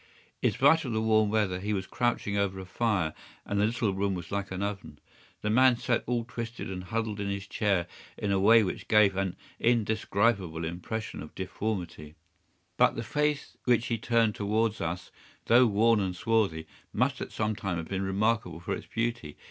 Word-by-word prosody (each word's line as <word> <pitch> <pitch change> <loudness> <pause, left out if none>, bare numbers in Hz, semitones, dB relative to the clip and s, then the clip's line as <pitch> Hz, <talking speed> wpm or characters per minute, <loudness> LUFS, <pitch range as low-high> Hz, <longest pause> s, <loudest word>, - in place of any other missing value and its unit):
In - - +4
spite 155 +4 +4
of 125 -5 -3
the 110 - +1
warm 110 -1 +3
weather 105 -4 +1
he 105 +3 -2
was 95 -1 -2
crouching 120 -4 -1
over 100 -1 0
a 95 - -7
fire, 95 -5 0 0.3
and 100 0 0
the 105 - +4
little 115 -3 0
room 100 0 0
was 90 - -7
like 100 0 -2
an 95 +1 -3
oven. 100 -7 -5 0.5
The 105 - 0
man 130 +1 +5
sat 120 -1 0
all 120 -1 0
twisted 115 -4 -6
and 90 -1 -6
huddled 110 +1 -2
in 100 -1 -2
his 100 -1 -3
chair 100 -6 0 0.3
in 100 - -2
a 100 - +2
way 110 +3 +6
which 95 - -4
gave 105 -3 +5
an 95 -1 -1 0.2
indescribable 105 -6 +1
impression 90 +7 -5
of 75 - -10
deformity; 90 -6 -4 0.6
but - - +4
the 115 - -3
face 150 +4 -1
which 120 -2 +3
he 115 -1 -1
turned 115 -1 +2
towards 110 +2 0
us, 85 +1 -4 0.3
though 120 +2 +6
worn 110 +2 +3
and 95 -2 -1
swarthy, 110 -8 +1 0.3
must - - 0
at - - -5
some 110 0 -1
time 95 -5 -3
have 80 -1 -5
been 95 -1 -2
remarkable 95 -2 0
for 85 - -3
its - - -6
beauty. 115 -10 -3
105 Hz, 190 wpm, -29 LUFS, 95-115 Hz, 0.6 s, way